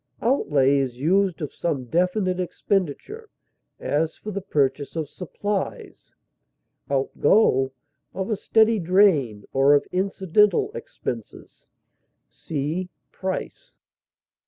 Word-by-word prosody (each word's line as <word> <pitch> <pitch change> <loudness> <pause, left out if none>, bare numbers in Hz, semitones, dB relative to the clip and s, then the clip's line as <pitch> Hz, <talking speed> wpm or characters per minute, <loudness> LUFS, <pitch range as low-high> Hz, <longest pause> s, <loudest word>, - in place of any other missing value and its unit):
Outlay 145 - +2
is 130 -3 -2
used 180 +4 +1
of 150 - -5
some 140 -7 -2
definite 180 - 0
expenditure, 195 - -2 0.5
as 155 +2 -1
for 215 - -7
the 200 0 -4
purchase 140 -5 -1
of 160 -2 -2
supplies; 195 +5 -5 0.7
outgo 135 0 +2 0.4
of 190 +3 -4
a - - +2
steady 220 +2 +3
drain 165 - +3
or 135 +2 +5
of 145 - +1
incidental 200 - +2
expenses. 475 -1 -8 0.6
See 160 +4 -4 0.2
PRICE. 190 - -5
180 Hz, 100 wpm, -24 LUFS, 145-200 Hz, 0.7 s, or